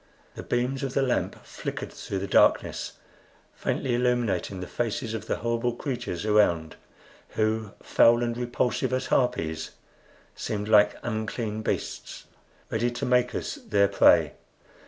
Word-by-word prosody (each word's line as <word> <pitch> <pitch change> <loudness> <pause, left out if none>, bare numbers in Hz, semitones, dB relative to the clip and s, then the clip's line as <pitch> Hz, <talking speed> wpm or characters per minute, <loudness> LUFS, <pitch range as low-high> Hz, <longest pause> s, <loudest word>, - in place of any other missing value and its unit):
The - - -7
beams 125 +2 -1
of 135 -1 -3
the 135 - +3
lamp 125 -2 -1
flickered - - -6
through 100 - -5
the 95 +1 -3
darkness, - - +3 0.6
faintly 130 - -2
illuminating 120 -5 0
the 90 - -4
faces 115 +3 -3
of 110 - -5
the - - 0
horrible 115 +1 -1
creatures 120 - -4
around, 85 -7 +2 0.6
who, 110 -1 0
foul 120 +1 +5
and 120 -1 -1
repulsive 125 +1 -1
as 130 0 0
harpies, 80 -11 0 0.6
seemed 105 -1 -4
like 105 -1 +5
unclean 110 -1 -3
beasts, - - -4 0.5
ready 115 +2 +1
to 120 - -4
make 125 0 +2
us - - -3
their 100 -1 +4
prey. 100 - +5
115 Hz, 135 wpm, -26 LUFS, 105-125 Hz, 0.6 s, foul